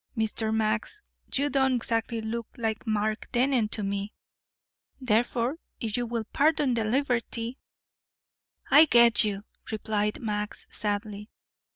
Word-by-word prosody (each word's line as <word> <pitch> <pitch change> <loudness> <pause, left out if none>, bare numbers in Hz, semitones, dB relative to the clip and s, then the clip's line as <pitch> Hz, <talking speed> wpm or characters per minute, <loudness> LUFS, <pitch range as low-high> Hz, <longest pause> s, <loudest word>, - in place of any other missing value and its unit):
Mr. 220 0 0
Max, 220 - -1 0.3
you 280 +2 +1
don't 265 -2 +2
exactly 230 -1 -1
look 225 +1 -4
like 225 0 -3
Mark 215 0 -1
Dennen 250 -2 +2
to 215 - -3
me, 200 +1 -3 0.9
therefore 240 +3 +1 0.2
if 220 -2 -2
you 245 -1 -1
will 230 -1 -2
pardon 295 -2 +3
the 230 -1 0
liberty 240 0 -1 0.6
" - - -30
"I 300 +3 +9
get 235 -5 +6
you," 205 -2 -2 0.3
replied 210 -1 -1
Max 210 -2 -3
sadly. 210 0 -2
225 Hz, 130 wpm, -27 LUFS, 215-245 Hz, 0.9 s, I